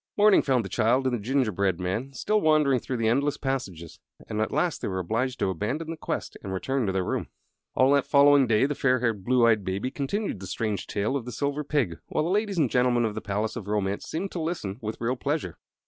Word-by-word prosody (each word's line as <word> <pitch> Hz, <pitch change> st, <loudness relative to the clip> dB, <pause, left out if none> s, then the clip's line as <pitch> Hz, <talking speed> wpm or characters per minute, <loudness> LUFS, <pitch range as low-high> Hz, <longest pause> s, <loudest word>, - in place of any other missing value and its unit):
Morning 210 Hz, 0 st, +6 dB
found 130 Hz, -6 st, +1 dB
the -, -, -6 dB
child 120 Hz, +6 st, +2 dB
and 130 Hz, -, +1 dB
the 115 Hz, -, -5 dB
gingerbread 100 Hz, -7 st, 0 dB
man 95 Hz, +9 st, -2 dB
still 210 Hz, +11 st, 0 dB
wandering 150 Hz, -4 st, +3 dB
through 125 Hz, +2 st, -4 dB
the 115 Hz, -1 st, 0 dB
endless 140 Hz, +5 st, +1 dB
passages, 100 Hz, -, -4 dB, 0.3 s
and 105 Hz, 0 st, -2 dB
at 110 Hz, -, -1 dB
last 155 Hz, +3 st, 0 dB
they -, -, -2 dB
were 95 Hz, -, -3 dB
obliged 115 Hz, +8 st, -1 dB
to 95 Hz, -, 0 dB
abandon 135 Hz, -, -3 dB
the -, -, -4 dB
quest 155 Hz, -, -4 dB
and 95 Hz, -, -6 dB
return 125 Hz, +5 st, -1 dB
to -, -, +1 dB
their 95 Hz, -1 st, 0 dB
room. -, -, -2 dB, 0.5 s
All 130 Hz, +1 st, +4 dB
that 140 Hz, -1 st, +2 dB
following 140 Hz, -2 st, +6 dB
day 110 Hz, +2 st, +3 dB
the 145 Hz, -, 0 dB
fair 130 Hz, -2 st, +2 dB
haired, 115 Hz, -5 st, -1 dB
blue 125 Hz, +2 st, +3 dB
eyed 110 Hz, -3 st, +3 dB
Baby 95 Hz, +7 st, -2 dB
continued 145 Hz, -, -3 dB
the 95 Hz, -, -7 dB
strange 100 Hz, +1 st, -3 dB
tale 105 Hz, +6 st, -1 dB
of 130 Hz, -5 st, -3 dB
the 125 Hz, -, -6 dB
Silver 145 Hz, +3 st, -2 dB
Pig, 130 Hz, -, -1 dB
while -, -, 0 dB
the 170 Hz, -, -1 dB
ladies 205 Hz, -1 st, 0 dB
and 155 Hz, -5 st, +3 dB
gentlemen 125 Hz, -1 st, +2 dB
of 110 Hz, -, -2 dB
the -, -, -5 dB
Palace 105 Hz, +2 st, -2 dB
of 110 Hz, -5 st, -6 dB
Romance 100 Hz, -1 st, -1 dB
seemed 185 Hz, +5 st, -3 dB
to 170 Hz, -, -4 dB
listen 140 Hz, -, -3 dB
with 110 Hz, 0 st, -5 dB
real 120 Hz, +2 st, 0 dB
pleasure. 140 Hz, -, -3 dB
125 Hz, 240 wpm, -26 LUFS, 105-140 Hz, 0.5 s, Morning